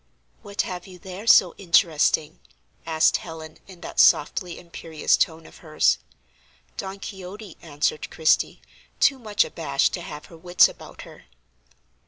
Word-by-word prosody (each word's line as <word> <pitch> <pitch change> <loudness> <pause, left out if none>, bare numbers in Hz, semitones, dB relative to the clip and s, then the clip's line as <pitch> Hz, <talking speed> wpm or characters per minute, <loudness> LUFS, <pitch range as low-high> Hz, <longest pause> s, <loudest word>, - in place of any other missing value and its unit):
"What 200 0 -3
have 180 0 -7
you 185 -1 -12
there 190 +4 -10
so 185 -7 +6
interesting?" 160 -4 +2 0.5
asked 160 -1 +3
Helen, 160 -2 -10
in 185 -3 -14
that - - -6
softly 175 +4 +3
imperious 165 -2 -1
tone 160 0 -1
of - - -15
hers. 155 -2 +1 0.8
"Don 195 0 -6
Quixote," 195 0 -9
answered 150 -1 -2
Christie, 160 -1 +1 0.4
too 275 -1 +3
much 210 -3 +1
abashed 140 -4 -1
to - - -4
have 150 0 -9
her 165 - -15
wits 175 +2 +4
about - - -12
her. - - -15
170 Hz, 140 wpm, -24 LUFS, 160-190 Hz, 0.8 s, so